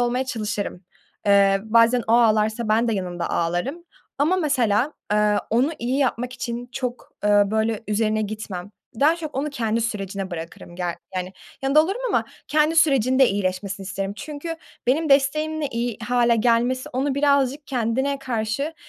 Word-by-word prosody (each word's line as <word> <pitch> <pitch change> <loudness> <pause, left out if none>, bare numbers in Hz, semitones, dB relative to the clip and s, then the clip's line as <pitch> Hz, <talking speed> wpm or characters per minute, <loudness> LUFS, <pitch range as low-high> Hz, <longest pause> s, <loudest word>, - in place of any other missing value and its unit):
olmaya 245 +2 +1
çalışırım. 210 -6 -4 0.4
Eee, 195 -1 +5
bazen 230 +2 +4
o 225 - +1
ağlarsa 220 -1 +3
ben 225 +2 +2
de 225 - +1
yanımda 180 -3 -3
ağlarım 175 - -1 0.3
ama 310 +6 +3
mesela, 270 - +1 0.2
eee, 210 0 +3
onu 245 +7 +2
iyi 250 +3 -1
yapmak 250 -2 0
için 245 -1 -5
çok, 250 -2 -5
ııı, 205 -1 +4
böyle, 220 0 0
üzerine 215 0 +1
gitmem. 205 -3 -6 0.3
Daha 310 +4 +5
çok 315 -3 -7
onu 285 +3 -2
kendi 230 -5 -1
sürecine 195 -3 -3
bırakırım. 170 0 -8
Ge 180 - -4 0.3
yani, 185 0 -3 0.3
yanında 275 +3 +5
olurum 390 +9 -3
ama - - +1 0.2
kendi 305 +2 +2
sürecinde 265 -4 +4
iyileşmesini 195 0 -2
isterim. 195 +1 -3
Çünkü 310 +4 -6 0.3
benim 310 +6 +2
desteğimle 305 +3 +2
iyi 235 -3 -3
hâle 240 -1 +3
gelmesi 240 +3 +1
onu 265 +2 0
birazcık 280 0 +2
kendine 265 +3 -1
karşı, 255 +4 -2
235 Hz, 150 wpm, -23 LUFS, 210-275 Hz, 0.4 s, Eee